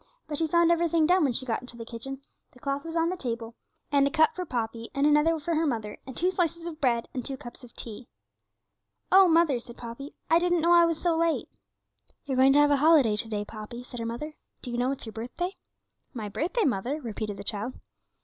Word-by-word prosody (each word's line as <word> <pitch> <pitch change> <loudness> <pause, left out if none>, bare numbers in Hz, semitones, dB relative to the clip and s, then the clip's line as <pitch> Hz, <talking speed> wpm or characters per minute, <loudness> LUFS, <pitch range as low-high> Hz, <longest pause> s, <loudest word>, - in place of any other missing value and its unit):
But 295 -2 -3
she 325 - +1
found 340 +1 +4
everything 335 -1 +3
done 360 +1 +4
when 270 -4 +2
she 260 - -2
got 230 -3 -1
into 250 -2 -9
the 230 - -7
kitchen, 265 +4 -7 0.3
the 250 - -18
cloth 275 +2 -2
was 330 0 -5
on 330 0 +2
the 365 - -2
table, 230 -6 -4 0.4
and 280 -1 +4
a - - +1
cup 315 +1 +3
for 365 - -3
Poppy, 230 -2 -3
and 280 +1 +2
another 300 +2 +4
for 335 +3 -2
her 320 0 +1
mother, 220 -5 -3
and 260 - -8
two 360 +2 +2
slices 340 -2 -1
of 330 -2 -7
bread, 235 -4 +1
and 255 - -3
two 270 +2 -5
cups 245 +1 -11
of 245 - -14
tea. 230 +1 -7 1.0
'Oh, 385 0 +8
mother,' 325 -6 +4
said 235 0 -13
Poppy, 240 +5 -8
'I 330 - +5
didn't 350 -1 +2
know 340 +2 +4
I 340 0 +7
was 330 -2 -1
so 340 -2 +1
late.' 330 0 0 0.8
'You're 270 -3 -2
going 265 +1 +6
to 290 - +5
have 290 0 +5
a 285 - +4
holiday 285 -7 +5
to 220 +2 0
day, 205 -1 -2
Poppy,' 220 +3 -8
said 245 -1 -8
her 230 - -3
mother; 300 +7 -5 0.3
'do 245 - -5
you 240 - -2
know 250 +1 +1
it's 275 - -5
your 220 - -8
birthday?' 250 - -4 0.6
'My 215 -3 -4
birthday, 360 - -1
mother?' 250 +5 -1
repeated 215 -5 -5
the 200 - -7
child. 210 +5 -2
275 Hz, 235 wpm, -27 LUFS, 235-330 Hz, 1.0 s, Oh